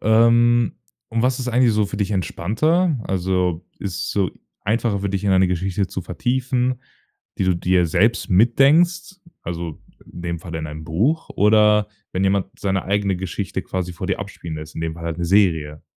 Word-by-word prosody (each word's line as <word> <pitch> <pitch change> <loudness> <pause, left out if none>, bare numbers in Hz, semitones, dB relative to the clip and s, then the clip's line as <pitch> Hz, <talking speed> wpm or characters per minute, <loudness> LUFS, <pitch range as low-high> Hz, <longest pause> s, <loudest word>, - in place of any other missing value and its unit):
Ähm, 115 +1 +4 0.3
und 115 0 -1
was 125 0 +1
ist 125 -1 -3
eigentlich 125 -1 +3
so 105 -1 +2
für 100 - -6
dich 100 0 -1
entspannter? 140 - +1
Also, 90 -2 -1
ist 95 -2 -4
so 100 -3 0 0.3
einfacher 110 -1 0
für 100 - -2
dich, 100 0 -2
in 100 - +2
eine 95 0 +4
Geschichte 95 +2 -1
zu 95 +1 -5
vertiefen, 125 +6 -1 0.6
die - - +1
du 95 -1 +2
dir 90 0 +2
selbst 100 +8 +1
mitdenkst, 160 - +3 0.3
also, 85 -2 -5 0.3
in 85 - -9
dem 85 -1 -3
Falle 85 -2 -6
in 80 - -4
einem 75 +1 -8
Buch 115 - 0
oder 105 0 +4 0.3
wenn 95 +1 0
jemand 95 -1 +2
seine 95 -2 -1
eigene 100 -1 0
Geschichte 95 +1 -4
quasi 90 -1 -4
vor 85 - -6
dir - - -1
abspielen 80 -2 -7
lässt, 75 0 -9
in - - -5
dem 80 -1 -3
Fall 85 0 -9
halt 85 0 -3
'ne 85 - -1
Serie? 80 -6 +2
95 Hz, 185 wpm, -21 LUFS, 90-115 Hz, 0.6 s, Ähm